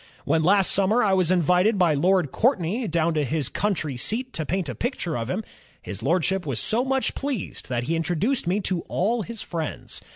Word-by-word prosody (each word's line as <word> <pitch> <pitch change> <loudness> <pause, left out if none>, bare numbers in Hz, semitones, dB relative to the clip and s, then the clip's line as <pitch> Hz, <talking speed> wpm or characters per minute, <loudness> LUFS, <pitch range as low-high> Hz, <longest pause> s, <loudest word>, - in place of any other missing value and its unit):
When 160 - +2
last 190 +3 +4
sxunmer 210 +5 +3
I 195 - +3
was 185 -3 +3
invited 180 +4 +3
by 175 -4 +4
Lord 175 0 +2
Courtney 220 - +1
down 165 -1 +1
to 155 -1 +1
his 145 0 -1
country 160 -10 -1
seat 250 - -2
to 160 - -3
paint 185 -2 -1
a 125 - -3
picture 180 - -3
of 115 0 -3
him,... 195 +9 -2 0.4
His - - -7
Lordship 185 +2 +1
was 135 -7 -2
so 235 +3 +1
much 265 0 0
pleased 270 - -5
that 120 -1 -1
he 165 +7 -1
introduced 175 - 0
me 190 +4 +1
to 185 -3 -1
all 225 +6 0
his 225 +1 -6
friends. 160 -3 -5
185 Hz, 200 wpm, -24 LUFS, 160-215 Hz, 0.4 s, last